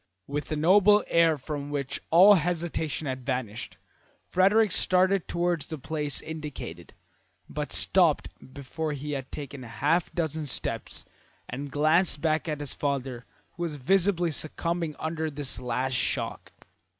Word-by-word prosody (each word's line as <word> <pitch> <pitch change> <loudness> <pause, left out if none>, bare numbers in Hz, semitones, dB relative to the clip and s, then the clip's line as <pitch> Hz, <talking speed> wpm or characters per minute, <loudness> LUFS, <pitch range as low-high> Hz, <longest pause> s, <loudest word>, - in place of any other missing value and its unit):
With 145 +2 -4
a - - +1
noble 200 +6 +5
air 165 -2 +4
from 145 +1 -5
which 140 -2 -3
all 185 +5 +8
hesitation 165 -3 -1
had 130 -2 -4
vanished, 125 -5 -4 0.5
Frederick 200 +3 +3
started 185 +1 +3
towards 170 -4 -1
the 160 - -5
place 150 0 -2
indicated, 145 - -7 0.5
but - - -5
stopped - - +3 0.2
before 150 +3 -4
he 145 +1 -5
had 135 -2 -4
taken 140 -2 -7
a - - -9
half 165 +4 +1
dozen 160 -2 -2
steps - - -4 0.4
and 140 +3 -5
glanced 155 +3 +3
back 160 +1 0
at 150 -1 -3
his 145 - -3
father, 135 -4 -3 0.3
who 175 - -11
was 165 -3 -2
visibly 175 +4 +2
succumbing 165 +1 -2
under 160 0 -2
this 145 -4 -3
last 125 +1 -2
shock. 125 - -2
155 Hz, 140 wpm, -27 LUFS, 140-170 Hz, 0.5 s, all